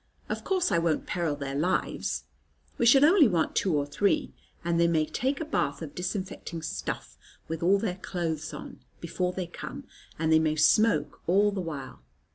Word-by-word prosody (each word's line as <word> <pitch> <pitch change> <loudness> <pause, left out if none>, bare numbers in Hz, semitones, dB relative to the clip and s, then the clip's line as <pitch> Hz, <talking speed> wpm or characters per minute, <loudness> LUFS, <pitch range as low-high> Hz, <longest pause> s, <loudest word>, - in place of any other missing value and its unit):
Of - - -3
course 375 -2 +1
I 170 - +3
won't 165 -2 0
peril 170 -5 -1
their 140 -1 -5
lives. 155 +7 -1 0.6
We 235 - +4
shall 270 +4 +7
only 325 -3 +6
want 170 -6 0
two 180 -6 +2
or 145 - 0
three; 170 +8 0 0.3
and 170 -1 +1
they 170 - +5
may 160 -2 +2
take 265 - -1
a 320 - -3
bath 155 - -1
of 145 - -8
disinfecting 180 -3 -4
stuff, 65 - -5 0.3
with 160 0 -4
all 185 +4 +4
their 195 -3 -2
clothes 165 -4 -3
on, - - -9 0.2
before 180 +2 -2
they 185 0 -4
come; 175 - -8 0.3
and 160 0 0
they 160 - +6
may 155 -1 +1
smoke 155 0 +3
all 200 +4 +4
the 195 -2 -3
while." 150 -6 -7
170 Hz, 185 wpm, -28 LUFS, 155-200 Hz, 0.6 s, shall